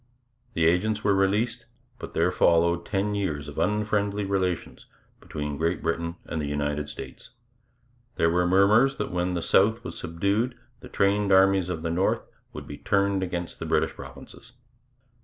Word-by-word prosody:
The 80 - +2
agents 105 +6 +1
were 100 - +3
released, 110 +5 0 0.3
but - - -8
there 85 +2 +2
followed 85 -1 +2
ten 105 +1 -1
years 80 -8 -2
of 75 - -6
unfriendly 105 0 0
relations 95 -3 -2 0.3
between 75 -2 -5
Great 85 +1 -1
Britain 85 +1 -2
and 80 - -3
the 75 - -3
United 75 0 -2
States. - - -9 0.9
There 85 0 +2
were 90 +1 +2
murmurs 105 +9 +4
that - - -4
when 90 0 -1
the 85 - -2
South 110 +4 +3
was - - -7
subdued 100 +9 -1 0.2
the - - -12
trained 100 +1 +1
armies 95 -1 +4
of 80 -3 -4
the 85 - -1
North 90 +3 +1 0.3
would - - -8
be - - -9
turned 100 -1 +1
against 90 -2 -4
the - - -4
British - - +1
provinces. 115 - -12
95 Hz, 160 wpm, -26 LUFS, 85-100 Hz, 0.9 s, murmurs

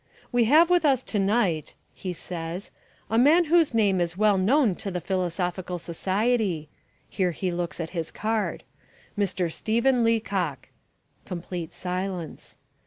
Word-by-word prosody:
"We 245 -1 +3
have 320 +8 +5
with 355 -1 +4
us 270 -4 +3
to 210 - -2
night," 195 -6 +1 0.2
he 185 - -5
says, 175 +1 -5 0.4
"a 225 - +2
man 310 +8 +6
whose 325 -5 +3
name 200 -5 +3
is 170 +1 -2
well 210 -2 +3
known 235 +3 +3
to 200 - -4
the 180 -2 -3
Philosophical 180 0 -2
Society" 190 -1 -1 0.4
(here 185 -3 0
he 180 +2 -2
looks 175 0 -3
at 165 -1 -4
his 165 -3 -3
card), 220 0 -2 0.5
"Mr. 185 -5 -1
Stephen 235 +3 +2
Leacock." 195 - 0 0.6
(Complete 175 -2 -5
silence.) 180 -2 -5
190 Hz, 140 wpm, -26 LUFS, 175-230 Hz, 0.6 s, man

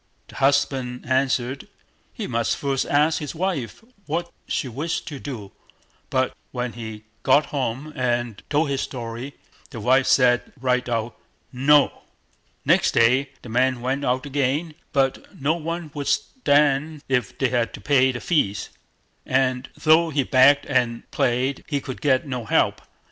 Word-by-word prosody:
The - - -12
husband 135 -2 +1
answered, 130 0 0 0.4
he - - -5
must 115 -1 0
first 135 -2 -1
ask 150 +2 +3
his 150 +1 -6
wife 175 - -3 0.2
what 170 +3 -2 0.2
she - - -1
wished 145 +8 -3
to 145 -3 -7
do; 115 -9 -7 0.6
but 130 -1 +1 0.2
when 125 -1 -3
he 110 -2 -8 0.2
got 140 +3 +4
home 135 +2 -2
and 120 -4 -1
told 150 +1 +2
his 135 - 0
story, 120 +2 -6 0.3
the 115 - -8
wife 130 +5 +3
said, 125 -2 +3
right 125 -1 0
out, 115 0 -2 0.4
"No!" 140 +3 +4 0.6
Next - - +3
day 130 +4 +4
the 120 - -9
man 125 +2 +2
went 135 +3 -1
out 130 +1 0
again, 145 +3 -1 0.2
but 135 -1 -1
no 145 +3 +2
one 165 -1 -4
would 145 -3 -4
stand 150 - +1
if 125 -5 -1
they 135 - +1
had 120 -2 0
to - - -11
pay 130 -3 +3
the 120 - -5
fees; 105 - 0 0.5
and 130 0 0
though 165 +1 +4
he 145 -3 +1
begged 130 +3 +5
and 125 -4 -1
prayed, 130 +2 0
he 145 -2 -1
could 130 -2 -7
get 130 -3 +2
no 125 -4 -4
help. - - +2
130 Hz, 155 wpm, -23 LUFS, 125-145 Hz, 0.6 s, begged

